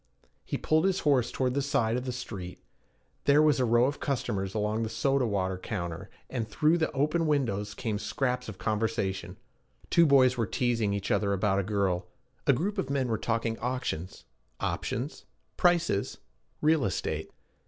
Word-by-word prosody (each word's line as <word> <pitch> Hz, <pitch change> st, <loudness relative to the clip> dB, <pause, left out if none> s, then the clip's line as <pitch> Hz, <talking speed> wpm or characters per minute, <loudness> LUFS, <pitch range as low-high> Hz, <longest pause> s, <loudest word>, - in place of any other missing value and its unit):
He -, -, -3 dB
pulled 155 Hz, +3 st, +2 dB
his 195 Hz, 0 st, +1 dB
horse 135 Hz, -5 st, +3 dB
toward 130 Hz, -1 st, 0 dB
that 140 Hz, -, +1 dB
side 130 Hz, -5 st, +1 dB
of 125 Hz, +1 st, -2 dB
the 130 Hz, -, -2 dB
street. 100 Hz, -7 st, -7 dB, 0.6 s
There 145 Hz, +1 st, +5 dB
was 150 Hz, -2 st, +4 dB
a 125 Hz, -, +3 dB
row 120 Hz, +1 st, +4 dB
of 140 Hz, +2 st, -2 dB
customers 105 Hz, -8 st, -2 dB
along 105 Hz, +1 st, 0 dB
the 110 Hz, -, -1 dB
soda 130 Hz, +3 st, +1 dB
water 95 Hz, -3 st, -1 dB
counter, 85 Hz, -5 st, -5 dB, 0.2 s
and 115 Hz, -4 st, -3 dB
through 155 Hz, +9 st, +2 dB
the 160 Hz, -, 0 dB
open 155 Hz, +4 st, +1 dB
windows 105 Hz, -9 st, 0 dB
came 110 Hz, -4 st, -2 dB
scraps 125 Hz, +2 st, -2 dB
of 100 Hz, -, -8 dB
conversation: 95 Hz, -3 st, -2 dB, 0.5 s
two 170 Hz, -1 st, +6 dB
boys 130 Hz, -3 st, +5 dB
were 115 Hz, -3 st, 0 dB
teasing 115 Hz, -3 st, 0 dB
each 100 Hz, -1 st, -3 dB
other 100 Hz, 0 st, +2 dB
about 100 Hz, 0 st, +1 dB
a -, -, 0 dB
girl; 95 Hz, -3 st, 0 dB, 0.4 s
a -, -, +8 dB
group 195 Hz, -, -1 dB
of 140 Hz, -, -2 dB
men 135 Hz, -3 st, 0 dB
were 110 Hz, -, 0 dB
talking 115 Hz, 0 st, -1 dB
auctions, 120 Hz, -8 st, -3 dB, 0.3 s
options, 130 Hz, +7 st, -3 dB, 0.3 s
prices, 170 Hz, -, +2 dB, 0.4 s
real 155 Hz, -2 st, +3 dB
estate. 100 Hz, -, -2 dB
120 Hz, 170 wpm, -29 LUFS, 100-140 Hz, 0.6 s, a